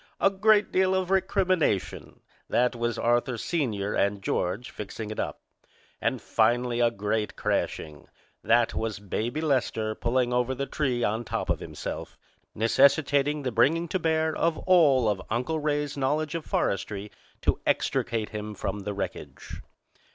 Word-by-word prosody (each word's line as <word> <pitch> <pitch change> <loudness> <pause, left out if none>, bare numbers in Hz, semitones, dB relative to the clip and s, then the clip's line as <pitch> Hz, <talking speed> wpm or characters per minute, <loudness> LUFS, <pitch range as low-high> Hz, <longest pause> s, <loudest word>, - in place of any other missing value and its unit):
A 195 - +4
great 210 +1 +3
deal 190 0 +3
of 185 0 -1
recrimination! 185 - 0 0.3
That 125 0 +2
was 120 0 -1
Arthur, 120 +1 +1
Sr., 110 - -1
and 100 0 +1
George 95 +8 -2
fixing 105 +1 -6
it 110 - -5
up. - - -3 0.6
And - - 0
finally 120 +2 +1
a 120 -1 +4
great 105 0 -2
crashing! 75 -2 -2 0.4
That 120 0 +3
was 110 -1 -2
Baby 110 - -3
Lester 125 -7 0
pulling 125 +2 0
over 125 +1 +1
the 140 +2 -2
tree 130 -5 -1
on 110 +3 0
top - - -2
of - - -1
himself, - - -6 0.4
necessitating 140 +5 +3
the 130 - -1
bringing 150 +9 +3
to 190 - 0
bear 160 -1 +1
of 165 -1 +1
all 150 -10 +5
of 100 -3 0
Uncle 125 +8 -1
Ray's 145 -1 -1
knowledge 145 +3 0
of 165 -2 -4
forestry 100 +1 -1 0.3
to - - +2
extricate 110 -2 0
him 105 0 -6
from 105 - -3
the 100 0 -5
wreckage. 95 -2 -6
125 Hz, 150 wpm, -27 LUFS, 110-155 Hz, 0.6 s, all